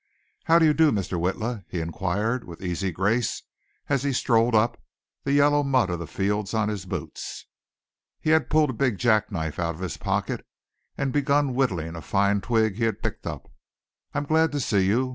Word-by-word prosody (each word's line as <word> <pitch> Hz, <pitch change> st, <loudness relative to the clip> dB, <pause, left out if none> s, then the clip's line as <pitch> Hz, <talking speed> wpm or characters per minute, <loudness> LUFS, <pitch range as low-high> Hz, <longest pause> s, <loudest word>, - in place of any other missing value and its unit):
"How 165 Hz, -, +6 dB
do 165 Hz, -, +5 dB
you 155 Hz, -, +5 dB
do, 160 Hz, 0 st, +4 dB
Mr. 95 Hz, -4 st, -2 dB
Witla," 105 Hz, +5 st, -2 dB
he 90 Hz, -, -3 dB
inquired 100 Hz, +8 st, -1 dB
with 85 Hz, +1 st, -11 dB
easy 90 Hz, +1 st, -2 dB
grace 100 Hz, +7 st, 0 dB, 0.4 s
as 140 Hz, -3 st, +1 dB
he 140 Hz, 0 st, 0 dB
strolled 115 Hz, -1 st, +2 dB
up, 115 Hz, +2 st, +2 dB, 0.4 s
the 140 Hz, -, 0 dB
yellow 145 Hz, +1 st, +4 dB
mud 130 Hz, -9 st, +2 dB
of 85 Hz, -, -2 dB
the 85 Hz, -, -6 dB
fields 100 Hz, +4 st, -1 dB
on 110 Hz, -1 st, +1 dB
his 100 Hz, -3 st, -5 dB
boots. -, -, -6 dB, 0.7 s
He 155 Hz, -, 0 dB
had 160 Hz, -1 st, +3 dB
pulled 155 Hz, -3 st, +3 dB
a -, -, -6 dB
big 120 Hz, -3 st, 0 dB
jackknife 100 Hz, -9 st, 0 dB
out 85 Hz, -1 st, -1 dB
of 85 Hz, -, -11 dB
his 95 Hz, -3 st, -4 dB
pocket -, -, -2 dB, 0.5 s
and 135 Hz, -2 st, -1 dB
begun 145 Hz, -1 st, +2 dB
whittling 90 Hz, -11 st, -1 dB
a 80 Hz, -, -6 dB
fine 100 Hz, +2 st, +1 dB
twig 110 Hz, 0 st, +1 dB
he 115 Hz, -, +1 dB
had 115 Hz, -3 st, -2 dB
picked -, -, -4 dB
up. -, -, -6 dB, 0.6 s
"I'm -, -, 0 dB
glad 160 Hz, +1 st, +3 dB
to 145 Hz, -, 0 dB
see 100 Hz, -7 st, +2 dB
you. 125 Hz, +6 st, +2 dB
110 Hz, 195 wpm, -25 LUFS, 95-135 Hz, 0.7 s, How